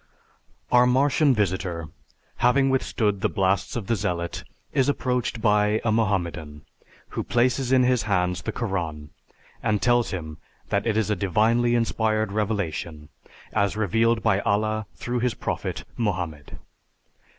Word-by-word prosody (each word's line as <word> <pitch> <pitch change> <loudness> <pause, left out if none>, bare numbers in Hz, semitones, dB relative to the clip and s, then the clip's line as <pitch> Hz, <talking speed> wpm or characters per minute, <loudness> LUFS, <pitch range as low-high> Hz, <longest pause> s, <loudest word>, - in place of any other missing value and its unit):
Our 125 0 +6
Martian 135 +2 +3
visitor, 95 -5 -1 0.5
having 135 +2 +3
withstood 105 -6 0
the - - +2
blasts 95 -1 0
of 115 -5 -3
the 115 - +1
Zealot, 85 -3 -3 0.3
is 135 0 +2
approached 125 -4 -1
by 105 0 +3
a 110 - +2
Mohammedan 85 -9 -1 0.4
who - - -3
places 125 +1 +1
in 130 -1 +5
his 125 -1 +3
hands 90 -2 +1
the - - -3
Koran 85 -9 -4 0.5
and 105 -2 +1
tells 120 +1 +2
him 80 -5 -6 0.3
that - - 0
it 110 -1 +1
is 110 -1 +1
a - - +2
divinely 110 +6 +2
inspired 110 -2 0
revelation, 95 -7 -3 0.4
as 100 +1 +1
revealed 115 +2 +2
by 95 - +3
Allah 110 +1 0
through 120 0 -3
his 125 -1 0
prophet, - - -4
Mohammed. 90 -10 -3
110 Hz, 140 wpm, -24 LUFS, 95-120 Hz, 0.5 s, Our